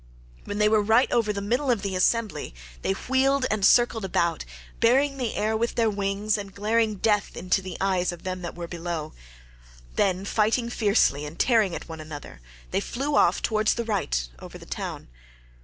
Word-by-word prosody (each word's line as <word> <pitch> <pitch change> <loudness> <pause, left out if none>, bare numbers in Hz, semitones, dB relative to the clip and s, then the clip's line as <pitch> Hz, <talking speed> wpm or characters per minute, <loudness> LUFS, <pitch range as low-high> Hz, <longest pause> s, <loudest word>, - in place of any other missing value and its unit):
When 205 - -4
they 210 0 +4
were 215 0 +4
right 220 +5 +3
over 230 -3 +2
the 200 -1 -3
middle 245 +7 0
of 230 -5 +1
the 195 -2 -2
assembly 210 - 0 0.3
they - - 0
wheeled 265 +5 +1
and 215 -2 -1
circled 230 +1 +4
about, 170 -3 0 0.3
beating 270 +4 +3
the 245 -3 -2
air 215 +1 0
with 235 +2 -1
their 225 -2 +2
wings 205 +1 -1
and 200 -1 -8
glaring 215 +1 +1
death 210 +1 0
into 185 +1 +1
the 185 -2 -7
eyes 185 -2 +1
of 175 -1 -10
them 185 -1 -4
that 175 - -6
were 170 -1 -6
below; 170 -2 -5 0.8
then, 190 -1 +1
fighting 225 +3 +1
fiercely 200 - +2
and 150 +3 -7
tearing 220 -8 +3
at - - -7
one 160 -1 -8
another, 145 - -9 0.3
they - - +1
flew 280 +4 -2
off - - +3
towards 215 -1 +2
the 235 - -3
right 175 - -1
over - - -10
the - - -13
town. - - -5
205 Hz, 190 wpm, -25 LUFS, 185-230 Hz, 0.8 s, they